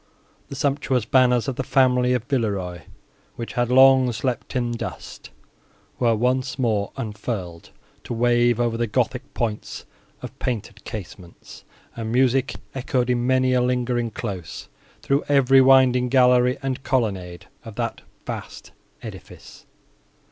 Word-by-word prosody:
The - - -7
sumptuous 135 -4 0
banners 125 -1 +3
of 135 - -3
the 135 - -1
family 125 -1 +3
of 125 -3 -1
Villeroi, 100 - -2 0.5
which 115 - -6
had 120 -1 0
long 130 0 +6
slept 125 +3 -3
in 120 -2 0
dust, 120 - -7 0.7
were 115 -2 +3
once 130 +3 0
more 110 -6 0
unfurled, 105 -6 -5 0.4
to - - -4
wave 120 0 +2
over 120 -1 0
the 120 0 -1
gothic 125 +4 -2
points 110 -3 -4 0.4
of - - -9
painted 120 -5 -4
casements; 90 -4 -10 0.3
and 115 -1 -4
music 130 +1 +2 0.2
echoed, 125 -1 -1
in 120 0 0
many 130 0 +2
a 125 - +3
lingering 125 -1 0
close, 95 -5 -7 0.3
through 140 +1 +1
every 135 -1 +5
winding 130 -1 +5
gallery 125 -1 +4
and 130 -1 -2
colonnade 95 - -2 0.2
of - - -10
that - - -3 0.2
vast - - -7 0.3
edifice. - - -11
125 Hz, 135 wpm, -23 LUFS, 115-130 Hz, 0.7 s, long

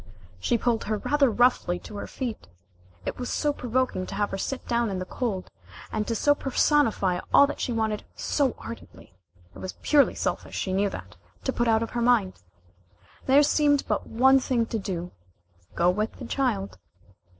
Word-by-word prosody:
She 235 - +1
pulled 230 -1 0
her 215 0 -1
rather 285 +4 +2
roughly 235 -6 +2
to 210 - -10
her - - -5
feet. 245 -5 -5 0.6
It - - -4
was 250 - -3
so 295 -1 0
provoking 250 -7 -1
to - - -6
have 205 0 0
her 195 - -2
sit 270 +6 -4
down 235 -1 +1
in 190 - -3
the 185 - -4
cold, 195 -2 -3 0.4
and 210 - -2
to 230 - -1
so 290 +6 +4
personify 265 -10 +2
all 280 - +8
that 290 - -5
she 250 - -1
wanted 220 -2 -1
so 275 -4 0
ardently, 230 - -11 0.4
it - - -12
was 185 - -5
purely 290 -2 +4
selfish, - - -3
she 190 - -2
knew 200 +1 +2
that, - - -9 0.3
to 265 - -1
put 240 - 0
out 225 0 +3
of 230 - -6
her 240 - -2
mind. 235 -6 +2 0.9
There 275 +3 +6
seemed 290 -1 +3
but - - -1
one 265 +4 +5
thing 245 -3 0
to 225 0 -3
do: 180 -3 -4 0.6
go 175 +1 +4
with 210 +4 -2
the 255 - -9
child. 100 - -1
235 Hz, 185 wpm, -26 LUFS, 200-265 Hz, 0.9 s, all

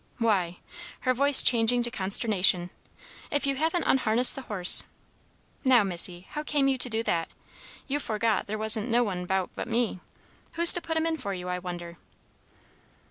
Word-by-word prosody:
Why," 190 -7 -1 0.4
her 255 - 0
voice 280 +2 +4
changing 240 0 +2
to 240 - -4
consternation, 190 -4 +2 0.6
"if 290 -1 -1
you 275 -1 -1
haven't 325 +3 -1
unharnessed 245 -1 +3
the 270 - -7
horse! 195 -8 +4 0.8
Now, 255 -5 +4
Missy, 180 -1 -1
how 300 - -5
came 295 -2 -1
you 265 -1 -1
to 250 - +4
do 225 0 -3
that? 165 -6 -2 0.6
You 285 +1 -2
forgot 225 -3 -2
there 215 +1 -5
wasn't 220 +1 -1
no 240 +1 +2
one 195 -5 -4
about 190 +1 -3
but - - -7
me. 230 -4 -2 0.6
Who's 340 0 +7
to 350 - 0
put 325 0 -4
him 320 - -1
in 325 -1 -2
for 200 -8 -6
you, 180 0 -8
I 180 0 -3
wonder?" 175 -1 -9
225 Hz, 175 wpm, -26 LUFS, 185-265 Hz, 0.8 s, Who's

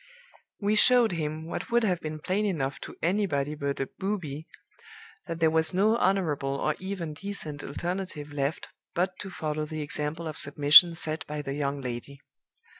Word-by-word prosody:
We 205 0 +1
showed 240 +1 +6
him, 155 -1 -3
what 165 - -5
would 235 0 +3
have 185 -5 +1
been 155 0 -4
plain 185 +7 -1
enough 150 -9 -1
to - - -8
anybody 165 -6 +1
but 140 -2 -3
a 135 - -1
booby, 170 -7 -3 0.8
that 165 -1 -4
there 160 -1 +4
was 160 +2 +2
no 210 +4 +4
honorable 160 -10 +1
or 155 +2 0
even 185 -5 -4
decent 155 -4 -6
alternative 170 -2 -4
left 140 +1 -2 0.3
but 180 +2 +1
to 195 - -6
follow 155 -4 -3
the 155 0 -4
example 150 +3 -2
of 155 - -4
submission 145 +4 +7
set 155 -1 -2
by 150 0 -4
the 135 - -4
young 140 -1 -2
lady. 125 +2 -6
160 Hz, 170 wpm, -28 LUFS, 145-185 Hz, 0.8 s, submission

